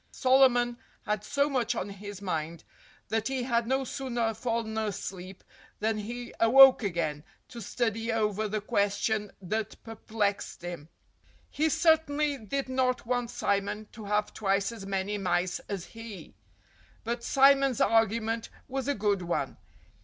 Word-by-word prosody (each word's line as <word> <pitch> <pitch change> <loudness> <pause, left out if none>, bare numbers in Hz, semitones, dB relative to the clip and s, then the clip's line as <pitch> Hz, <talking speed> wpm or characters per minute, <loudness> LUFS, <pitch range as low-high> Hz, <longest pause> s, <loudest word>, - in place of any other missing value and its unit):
Solomon 255 -2 +3 0.2
had 210 -1 -2
so 280 +4 +1
much 245 -4 0
on - - -2
his 200 0 -8
mind 165 -2 -3 0.5
that 225 -1 0
he 265 -2 -1
had 235 -2 0
no 265 +2 +1
sooner 240 -4 -2
fallen 225 -1 -2
asleep 190 -3 -5 0.4
than 220 0 0
he 240 +3 -6
awoke 260 +4 +8
again, 165 -7 -2 0.3
to 235 - -8
study 225 +1 -1
over 215 -1 0
the 210 0 -2
question 205 0 0
that 215 +3 -3
perplexed 215 -4 -3
him. 170 -3 -7 0.6
He 315 +2 +1
certainly 305 -2 +2
did 265 +6 -3
not 255 -2 0
want 245 0 -1
Simon 205 0 -1
to 220 - -10
have 210 +1 0
twice 195 0 0
as 210 -4 -8
many 195 +1 -2
mice 180 -1 0
as 195 -4 -4
he. 225 -7 -10 0.7
But 235 +1 -3
Simon's 275 -2 +4
argument 225 0 +2 0.2
was 265 0 -3
a 285 - +1
good 205 -2 +1
one. 175 -1 -2
225 Hz, 140 wpm, -29 LUFS, 200-245 Hz, 0.7 s, awoke